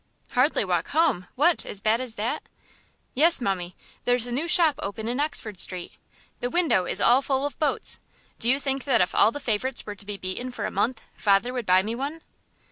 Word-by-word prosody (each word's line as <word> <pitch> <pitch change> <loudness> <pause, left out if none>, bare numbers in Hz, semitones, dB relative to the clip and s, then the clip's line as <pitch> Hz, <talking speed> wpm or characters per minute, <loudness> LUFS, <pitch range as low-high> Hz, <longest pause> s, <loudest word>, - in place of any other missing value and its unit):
"Hardly 255 -3 +2
walk 175 -3 0
home! 285 - +1
What, 320 +6 +2
as 200 - -3
bad 220 +4 +1
as 245 -3 -2
that?" 220 +3 -2 0.7
"Yes, 330 +6 +5
mummie. 185 -6 -2 0.3
There's 245 -1 +2
a 245 - -6
new 285 +8 -1
shop 320 -4 +3
open 215 +2 -5
in 245 +3 -2
Oxford 225 - -2
Street. 180 -2 +1 0.5
The 245 - -2
window 315 - +2
is - - -1
all 245 +3 +5
full 270 0 -1
of 290 - -5
boats. 300 -3 0 0.4
Do 235 - +2
you 270 +2 +3
think 270 -1 -2
that 260 -5 +3
if 180 - +1
all 215 - +4
the 290 - -6
favourites 250 +1 0
were 210 - -5
to 205 0 -7
be 205 -1 -3
beaten 185 +7 -4
for 250 - -5
a - - -3
month, 240 -1 -1
father 205 +4 +2
would 245 -4 -4
buy 185 +1 +5
me 220 +3 -3
one?" 285 +6 -5
245 Hz, 210 wpm, -25 LUFS, 205-275 Hz, 0.7 s, Yes